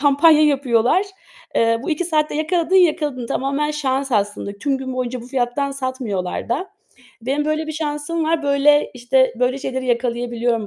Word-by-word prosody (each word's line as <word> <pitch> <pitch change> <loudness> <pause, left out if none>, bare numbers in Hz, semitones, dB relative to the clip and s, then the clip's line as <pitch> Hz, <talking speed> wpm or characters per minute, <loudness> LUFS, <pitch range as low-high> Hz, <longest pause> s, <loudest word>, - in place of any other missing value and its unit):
kampanya 300 +2 +5
yapıyorlar. 275 - +2 0.5
Eee, 230 0 +2
bu 325 - -3
2 320 +3 -1
saatte 305 -3 0
yakaladın 330 +3 0
yakaladın. 300 -8 +2
Tamamen 280 +4 -1
şans 275 -2 -2
aslında. 205 -1 -1
Tüm 275 +3 -1
gün 260 -1 -5
boyunca 255 -1 -3
bu 240 - -11
fiyattan 260 +2 -1
satmıyorlar 255 -11 -4
da. 295 +11 -2 0.5
Benim 275 +5 -1
böyle 310 +1 -1
bir 315 - -4
şansım 305 +1 -2
var. 320 0 0
Böyle, 285 +1 +3
işte, 255 +1 +2
böyle 250 +2 +1
şeyleri 260 -1 -4
yakalayabiliyorum 235 -2 -1
275 Hz, 160 wpm, -20 LUFS, 245-300 Hz, 0.5 s, kampanya